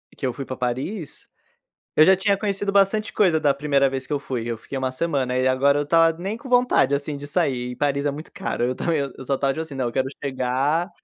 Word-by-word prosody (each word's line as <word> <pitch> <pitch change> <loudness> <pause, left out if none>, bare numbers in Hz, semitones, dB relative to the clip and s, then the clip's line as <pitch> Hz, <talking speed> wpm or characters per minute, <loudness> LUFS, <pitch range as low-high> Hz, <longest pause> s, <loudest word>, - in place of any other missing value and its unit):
que - - -5
eu 125 - 0
fui 135 - -6
pra 130 - -5
Paris, 135 - -4 0.7
eu 155 - +7
já 190 +3 +6
tinha 200 +1 +2
conhecido 200 0 -2
bastante 200 +2 +2
coisa 175 -6 +3
da 145 -2 +3
primeira 140 -1 +2
vez 135 0 -5
que 150 - -3
eu 145 - 0
fui, 125 -4 -4
eu 115 - -3
fiquei 115 - -9
uma 130 -1 -1
semana, 130 -3 -1
e 130 0 +2
agora 140 +2 +3
eu 145 - -1
tava 165 +1 +4
nem 195 +5 -3
com 255 +2 -10
vontade 245 - +3
assim 145 +1 -3
de 145 0 -8
sair 135 -6 -1
e - - -7
Paris 140 +2 0
é 145 - +2
muito 150 +3 -9
caro, - - -3
eu 130 +1 -1
também 165 +1 0
eu 140 -2 -4
só 135 +1 +1
estava 135 0 0
tipo 160 - -4
assim 160 -3 -8
não, 130 -2 -1
eu 120 - -2
quero 130 +1 0 0.2
chegar 140 +6 0
140 Hz, 255 wpm, -23 LUFS, 130-170 Hz, 0.7 s, eu